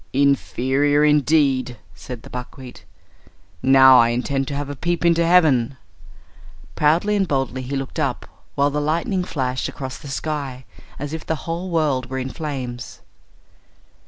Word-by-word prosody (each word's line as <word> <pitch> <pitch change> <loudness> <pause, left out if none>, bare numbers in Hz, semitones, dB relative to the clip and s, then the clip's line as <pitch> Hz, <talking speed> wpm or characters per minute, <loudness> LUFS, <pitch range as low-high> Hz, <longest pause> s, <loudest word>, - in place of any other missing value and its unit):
"Inferior, 140 +1 +2
indeed!" 140 -4 +2 0.2
said 125 -3 -9
the - - -12
buckwheat. 125 -6 -9 0.8
"Now 130 -1 +7
I 115 - +4
intend 135 +3 -1
to 140 - -4
have 145 0 -3
a 145 - -6
peep 170 +4 -2
into 170 0 +4
heaven." 150 -8 +3 1.0
Proudly 170 +8 +2
and 195 -2 +1
boldly 135 -3 -1
he 130 +2 -4
looked 135 -1 -4
up, - - -1 0.3
while 140 +1 +2
the 150 +1 -1
lightning 170 +5 0
flashed 130 -7 -2
across 130 -2 -7
the - - -11
sky 140 -3 -4 0.3
as 145 +2 -5
if 160 - -5
the 160 - -4
whole 170 +3 -4
world 145 -7 0
were 130 - -4
in 130 0 -4
flames. 130 -6 -6
140 Hz, 150 wpm, -21 LUFS, 130-155 Hz, 1.0 s, Now